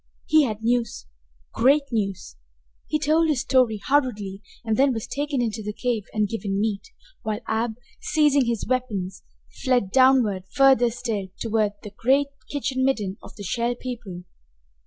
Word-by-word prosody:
He 310 Hz, -2 st, +5 dB
had 220 Hz, -2 st, -4 dB
news, 235 Hz, -, 0 dB, 0.5 s
great 280 Hz, +4 st, +4 dB
news! 195 Hz, -5 st, -2 dB, 0.5 s
He 305 Hz, -, +1 dB
told 310 Hz, +2 st, +2 dB
his 280 Hz, -6 st, +1 dB
story 250 Hz, -5 st, +2 dB
hurriedly, 210 Hz, -9 st, 0 dB, 0.2 s
and 220 Hz, -1 st, +1 dB
then 270 Hz, +2 st, +3 dB
was 225 Hz, -2 st, -4 dB
taken 280 Hz, 0 st, -2 dB
into 220 Hz, -1 st, -2 dB
the 210 Hz, 0 st, -4 dB
cave 230 Hz, -3 st, -2 dB
and 210 Hz, -1 st, +1 dB
given 200 Hz, -2 st, -2 dB
meat, 210 Hz, -2 st, 0 dB, 0.4 s
while 215 Hz, +1 st, -3 dB
Ab, 220 Hz, 0 st, -1 dB, 0.3 s
seizing 295 Hz, -3 st, +3 dB
his 235 Hz, -2 st, -1 dB
weapons, 210 Hz, -8 st, -2 dB, 0.4 s
fled 245 Hz, -7 st, +2 dB
downward 250 Hz, -8 st, +4 dB
further 265 Hz, -3 st, +5 dB
still 225 Hz, -4 st, -3 dB
toward 215 Hz, -2 st, 0 dB
the 210 Hz, -, -8 dB
great 275 Hz, +5 st, +2 dB, 0.2 s
kitchen 265 Hz, -2 st, -1 dB
midden 210 Hz, -7 st, 0 dB
of -, -, -13 dB
the 205 Hz, -, -8 dB
Shell 235 Hz, +5 st, -1 dB
People. 230 Hz, -8 st, -7 dB
235 Hz, 155 wpm, -24 LUFS, 210-265 Hz, 0.5 s, He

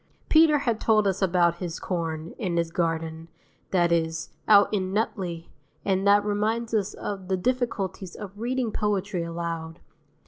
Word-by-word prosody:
Peter 315 Hz, -1 st, +6 dB
had 235 Hz, -6 st, -1 dB
told 215 Hz, -2 st, +3 dB
us 195 Hz, 0 st, 0 dB
about 175 Hz, -2 st, +3 dB
his 175 Hz, -2 st, -5 dB
corn, 165 Hz, -3 st, -3 dB
in 180 Hz, -7 st, -1 dB
his 170 Hz, -1 st, 0 dB
garden, 165 Hz, -1 st, -2 dB, 0.4 s
that 175 Hz, -2 st, +2 dB
is, 165 Hz, -1 st, 0 dB, 0.2 s
out 205 Hz, -1 st, +7 dB
in 190 Hz, -2 st, 0 dB
Nutley 185 Hz, -5 st, -2 dB, 0.3 s
(and 195 Hz, 0 st, +1 dB
that 205 Hz, 0 st, +5 dB
reminds 220 Hz, +3 st, -1 dB
us 210 Hz, -2 st, 0 dB
of 195 Hz, -2 st, -5 dB
the 190 Hz, 0 st, +1 dB
difficulties 210 Hz, -5 st, -2 dB
of 205 Hz, -3 st, -7 dB
reading 245 Hz, 0 st, -1 dB
poetry 200 Hz, -3 st, -1 dB
aloud. 165 Hz, -1 st, -4 dB
190 Hz, 150 wpm, -26 LUFS, 170-210 Hz, 0.4 s, out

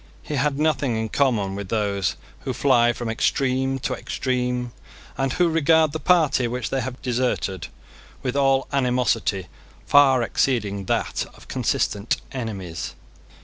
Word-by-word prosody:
He -, -, -6 dB
had 140 Hz, 0 st, +1 dB
nothing 150 Hz, -5 st, +1 dB
in 110 Hz, 0 st, -2 dB
common 110 Hz, -9 st, +1 dB
with 100 Hz, -1 st, -6 dB
those 100 Hz, -3 st, 0 dB, 0.2 s
who -, -, -4 dB
fly 120 Hz, 0 st, +4 dB
from 120 Hz, 0 st, -5 dB
extreme 130 Hz, +3 st, +1 dB
to -, -, 0 dB
extreme, 125 Hz, -1 st, -2 dB, 0.4 s
and 135 Hz, -1 st, -1 dB
who 180 Hz, -, +3 dB
regard 160 Hz, -1 st, +3 dB
the 160 Hz, -, -4 dB
party 155 Hz, -9 st, +3 dB
which 125 Hz, 0 st, -3 dB
they 135 Hz, -, 0 dB
have 125 Hz, +1 st, -5 dB
deserted 120 Hz, -8 st, -1 dB, 0.6 s
with 130 Hz, 0 st, -2 dB
all 135 Hz, -1 st, +3 dB
animosity 125 Hz, -7 st, +1 dB, 0.4 s
far 135 Hz, -3 st, +5 dB
exceeding 105 Hz, -6 st, 0 dB
that -, -, -1 dB
of -, -, -16 dB
consistent 105 Hz, +2 st, 0 dB
enemies. 100 Hz, -10 st, -5 dB
125 Hz, 140 wpm, -23 LUFS, 110-135 Hz, 0.6 s, far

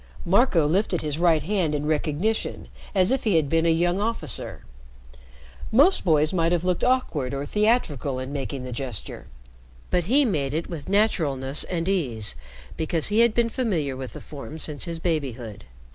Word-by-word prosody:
Marco 190 Hz, -, +3 dB
lifted 175 Hz, +1 st, 0 dB
his 150 Hz, 0 st, -2 dB
right 165 Hz, -4 st, +3 dB
hand 175 Hz, -4 st, 0 dB
in 145 Hz, 0 st, -2 dB
recognition, 155 Hz, +8 st, -1 dB, 0.3 s
as 185 Hz, +2 st, +3 dB
if 265 Hz, -, +1 dB
he 210 Hz, -6 st, +2 dB
had 155 Hz, -3 st, +3 dB
been 165 Hz, +3 st, +2 dB
a -, -, +4 dB
young 175 Hz, +3 st, +2 dB
officer. 205 Hz, -, -3 dB, 1.1 s
Most 285 Hz, -, +5 dB
boys 155 Hz, -2 st, +2 dB
might 165 Hz, -2 st, +1 dB
have 175 Hz, -1 st, +1 dB
looked 180 Hz, -1 st, 0 dB
awkward 155 Hz, -, 0 dB
or 140 Hz, +1 st, -3 dB
theatrical 165 Hz, -, 0 dB
in 130 Hz, +2 st, -5 dB
making 135 Hz, -1 st, -4 dB
the 125 Hz, -, -6 dB
gesture, 125 Hz, -3 st, -6 dB, 0.6 s
but 175 Hz, -2 st, +1 dB
he 275 Hz, +8 st, +4 dB
made 145 Hz, -, -1 dB
it 165 Hz, -, -2 dB
with 165 Hz, -1 st, -7 dB
naturalness 150 Hz, -10 st, +2 dB
and 170 Hz, -1 st, -3 dB
ease, 130 Hz, -, +1 dB, 0.4 s
because 160 Hz, +1 st, +1 dB
he 210 Hz, +2 st, +2 dB
had 235 Hz, -1 st, +4 dB
been 235 Hz, -1 st, +2 dB
familiar 180 Hz, -, -1 dB
with 130 Hz, -1 st, -7 dB
the -, -, -9 dB
form 150 Hz, +1 st, -9 dB
since 150 Hz, -1 st, -2 dB
his 170 Hz, -1 st, -4 dB
babyhood. 135 Hz, -, -3 dB
165 Hz, 175 wpm, -24 LUFS, 145-195 Hz, 1.1 s, Most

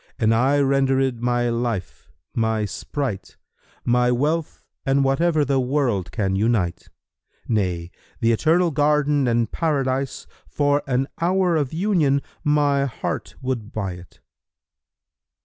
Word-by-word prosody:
an 115 Hz, -3 st, +2 dB
I 130 Hz, +5 st, +3 dB
rendered 135 Hz, -3 st, +2 dB
my 120 Hz, 0 st, +1 dB
life, 115 Hz, -5 st, -3 dB, 0.2 s
my 110 Hz, -1 st, 0 dB
sprite, 120 Hz, +1 st, -5 dB, 0.3 s
* -, -, -34 dB
My 125 Hz, 0 st, +3 dB
wealth 150 Hz, +6 st, -1 dB, 0.2 s
and 135 Hz, +1 st, +2 dB
whatever 155 Hz, +3 st, +2 dB
the 135 Hz, 0 st, +1 dB
world 125 Hz, -, 0 dB
can 95 Hz, -4 st, -1 dB
unite; 100 Hz, -4 st, 0 dB, 0.6 s
Nay, 90 Hz, -6 st, -1 dB, 0.3 s
th' -, -, -3 dB
Eternal 160 Hz, +10 st, +3 dB
Garden 145 Hz, -1 st, +2 dB
and 115 Hz, -2 st, +1 dB
Paradise[FN#311] 135 Hz, -4 st, -1 dB, 0.2 s
* -, -, -40 dB
For 145 Hz, 0 st, +3 dB
an 135 Hz, +1 st, +1 dB
hour 180 Hz, 0 st, +2 dB
of 145 Hz, -5 st, 0 dB
Union 160 Hz, -6 st, +1 dB, 0.2 s
my 145 Hz, -2 st, +2 dB
heart 130 Hz, -, -4 dB
would 120 Hz, -5 st, -3 dB
buy't!" 90 Hz, -4 st, -6 dB
135 Hz, 125 wpm, -22 LUFS, 115-145 Hz, 0.6 s, I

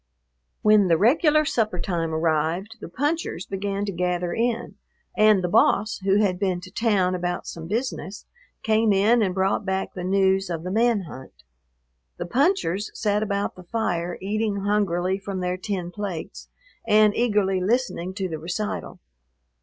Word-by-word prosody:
When 210 Hz, -2 st, +5 dB
the 165 Hz, -2 st, +4 dB
regular 305 Hz, -, +4 dB
supper 215 Hz, -9 st, 0 dB
time 170 Hz, -2 st, -2 dB
arrived 160 Hz, +6 st, -1 dB
the -, -, -7 dB
punchers 295 Hz, -, -2 dB
began 200 Hz, +1 st, -3 dB
to 200 Hz, -, -3 dB
gather 180 Hz, -1 st, -1 dB
in, 235 Hz, 0 st, -1 dB, 0.4 s
and 215 Hz, -3 st, +4 dB
the -, -, +1 dB
"boss," 205 Hz, +4 st, +2 dB
who 195 Hz, 0 st, +2 dB
had 185 Hz, -3 st, 0 dB
been 190 Hz, -3 st, 0 dB
to 185 Hz, 0 st, -11 dB
town 195 Hz, -4 st, +1 dB
about 175 Hz, -1 st, -3 dB
some 165 Hz, -1 st, -7 dB
business, 220 Hz, -1 st, -4 dB, 0.4 s
came 220 Hz, -1 st, +3 dB
in 215 Hz, +5 st, +4 dB
and 185 Hz, -4 st, 0 dB
brought 190 Hz, +2 st, +1 dB
back 190 Hz, 0 st, -2 dB
the 180 Hz, -, -6 dB
news 190 Hz, 0 st, +2 dB
of 165 Hz, -2 st, -4 dB
the 180 Hz, -, -4 dB
man 225 Hz, 0 st, +2 dB
hunt. 130 Hz, -, -11 dB, 0.7 s
The -, -, -4 dB
punchers 235 Hz, -, +1 dB
sat 210 Hz, -1 st, +1 dB
about 200 Hz, -1 st, -1 dB
the 185 Hz, -, -12 dB
fire, 175 Hz, -4 st, -2 dB
eating 205 Hz, +1 st, -1 dB
hungrily 190 Hz, -2 st, 0 dB
from 195 Hz, -1 st, -5 dB
their 180 Hz, 0 st, -1 dB
tin 185 Hz, -2 st, -4 dB
plates 190 Hz, -5 st, -6 dB, 0.4 s
and 210 Hz, -1 st, +5 dB
eagerly 205 Hz, -5 st, +1 dB
listening 190 Hz, -4 st, -1 dB
to 195 Hz, -2 st, -2 dB
the 160 Hz, -3 st, -5 dB
recital. 180 Hz, +6 st, -4 dB
195 Hz, 160 wpm, -24 LUFS, 180-215 Hz, 0.7 s, When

